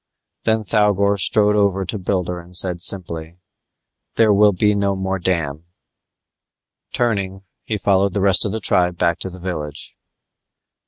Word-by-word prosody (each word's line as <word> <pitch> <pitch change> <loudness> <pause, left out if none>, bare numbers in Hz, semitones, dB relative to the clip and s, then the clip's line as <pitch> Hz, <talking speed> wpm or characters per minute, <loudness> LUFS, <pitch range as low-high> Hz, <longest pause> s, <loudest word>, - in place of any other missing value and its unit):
Then 110 0 +1
Thougor 100 -1 +1
strode 105 +2 +3
over 100 -2 +1
to 105 +3 -5
Builder 90 -2 -2
and 90 +1 -4
said 90 -2 +2
simply, 85 -3 -3 0.8
"There 110 -2 +4
will 105 +1 +5
be 105 +2 +1
no 100 -1 0
more 95 0 -3
dam." 85 -4 -2 1.3
Turning 100 -5 -2 0.2
he 110 - -2
followed 100 -1 +1
the 100 - -1
rest 95 -1 +5
of 105 - -2
the 110 - -3
tribe 90 -2 +2
back 85 -1 0
to 95 - -3
the 90 - -11
village. 85 -6 -6
95 Hz, 150 wpm, -19 LUFS, 90-105 Hz, 1.3 s, will